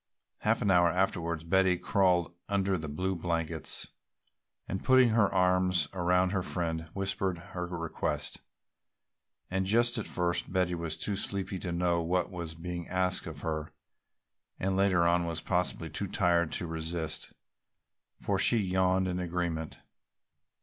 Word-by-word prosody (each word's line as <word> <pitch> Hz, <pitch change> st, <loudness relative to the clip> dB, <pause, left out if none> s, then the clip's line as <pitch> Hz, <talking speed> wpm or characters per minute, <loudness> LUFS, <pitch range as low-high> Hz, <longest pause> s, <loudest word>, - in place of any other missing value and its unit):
Half -, -, +1 dB
an 100 Hz, -, +3 dB
hour 85 Hz, -1 st, +5 dB
afterwards 85 Hz, -2 st, 0 dB
Polly 95 Hz, +1 st, +3 dB
crawled 90 Hz, -3 st, +2 dB, 0.2 s
under 100 Hz, -1 st, +1 dB
the 80 Hz, -3 st, -4 dB
blue 90 Hz, +6 st, -2 dB
blankets 85 Hz, -1 st, -1 dB, 0.8 s
and 95 Hz, -, -4 dB
putting 130 Hz, -2 st, +6 dB
her 110 Hz, -3 st, +3 dB
arms 90 Hz, -2 st, +3 dB
about 90 Hz, 0 st, +2 dB
her 95 Hz, -2 st, 0 dB
friend 80 Hz, -3 st, -3 dB
whispered 95 Hz, -2 st, -1 dB
her 90 Hz, 0 st, -6 dB
request. 85 Hz, -2 st, -3 dB, 1.1 s
And 95 Hz, 0 st, 0 dB
just 120 Hz, +3 st, +3 dB
at 110 Hz, -, -4 dB
first 85 Hz, -1 st, -1 dB
Betty 90 Hz, -1 st, +1 dB
was 85 Hz, -2 st, -3 dB
too 105 Hz, -, -1 dB
sleepy 95 Hz, -1 st, -1 dB
to 90 Hz, -, -4 dB
know 85 Hz, 0 st, +1 dB
what 90 Hz, +2 st, 0 dB
was 85 Hz, -3 st, -6 dB
being 85 Hz, +1 st, -5 dB
asked 90 Hz, 0 st, 0 dB
of -, -, -7 dB
her 80 Hz, -1 st, -3 dB, 0.9 s
and 95 Hz, 0 st, 0 dB
later 95 Hz, -3 st, +3 dB
on 85 Hz, 0 st, +2 dB
was 80 Hz, -1 st, -2 dB
possibly 90 Hz, -3 st, -1 dB
too 100 Hz, +6 st, -2 dB
tired 85 Hz, -4 st, +2 dB
to -, -, -1 dB
resist, 80 Hz, -1 st, -3 dB, 0.9 s
for -, -, -1 dB
she 120 Hz, -, +5 dB
yawned 95 Hz, -2 st, +2 dB
an 90 Hz, 0 st, -2 dB
agreement. 85 Hz, -2 st, -3 dB
90 Hz, 145 wpm, -30 LUFS, 85-95 Hz, 1.1 s, putting